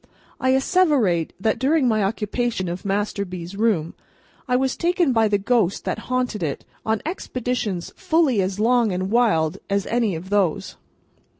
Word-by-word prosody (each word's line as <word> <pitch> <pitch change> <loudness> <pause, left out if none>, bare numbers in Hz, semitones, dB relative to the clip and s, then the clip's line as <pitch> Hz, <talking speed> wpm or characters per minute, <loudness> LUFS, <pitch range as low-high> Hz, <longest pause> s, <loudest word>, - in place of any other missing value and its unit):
I 260 0 +2
asseverate 265 - +2
that, 220 +3 0
during 275 0 +2
my 215 -2 +2
occupation 210 0 -1
of 175 +2 -5
Master 200 +1 -1
B.'s 180 -1 -7
room, 200 -7 +1 0.5
I 250 - +1
was 260 +1 +1
taken 345 -5 +1
by 225 -1 +3
the 205 -1 +2
ghost 205 -2 0
that - - -2
haunted 250 -5 -1
it, 150 -5 -3 0.2
on 220 0 -1
expeditions 250 - -3
fully 320 - +2
as 190 +1 -2
long 235 -1 +3
and 185 +2 -2
wild 210 -10 +2
as 200 0 0
any 230 -6 0
of 180 +4 -8
those. 195 -6 0
220 Hz, 160 wpm, -22 LUFS, 190-250 Hz, 0.5 s, by